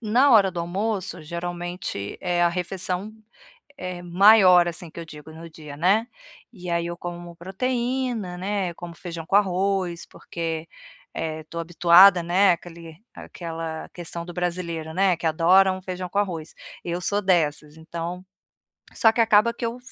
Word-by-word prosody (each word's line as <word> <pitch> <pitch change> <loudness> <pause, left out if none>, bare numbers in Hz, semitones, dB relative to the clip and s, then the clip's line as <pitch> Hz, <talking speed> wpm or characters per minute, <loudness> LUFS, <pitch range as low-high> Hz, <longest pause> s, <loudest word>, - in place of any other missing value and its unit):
Na 240 +6 +3
hora 205 -5 +6
do 175 -1 -4
almoço 190 0 -3
geralmente 175 - -5
é 175 -1 0
a 175 - +5
refeição, 180 +3 -3 0.7
eh, 180 -1 -6
maior 185 0 +6
assim, 170 -1 -7
que - - -12
eu 165 - -7
digo 150 -1 -12
no 165 +1 -10
dia, 150 -3 -11
né, 200 +8 +2 0.5
e 180 -5 -10
aí 170 0 0
eu 170 0 -5
como 175 0 -8
proteína, 240 +1 -2
né, 190 0 -2
eu - - -11
como 170 0 -9
feijão 170 -1 -7
com 195 - +2
arroz, 190 -3 0
porque, 165 -1 -6 0.5
eh, 160 -1 -4
estou 170 +2 -7
habituada, 175 +2 +6
né, 185 +3 +4
aquele 170 -2 -8 0.2
aquela 165 -2 -7
questão 170 -1 -7
do 175 - -9
brasileiro, 170 -3 -3
né, 190 -1 +3
que 165 - -5
adora 180 +4 +4
um 185 - -6
feijão 185 -1 -5
com 200 - -3
arroz, 170 -6 -3 0.3
eu 175 0 -3
sou 205 +3 0
dessas, 155 -5 0
então 170 +3 -6 0.7
só 225 - +4
que 230 - -5
acaba 220 +1 +4
que 235 - -5
eu 230 +2 -3
fa 250 - -16
175 Hz, 165 wpm, -24 LUFS, 170-195 Hz, 0.7 s, hora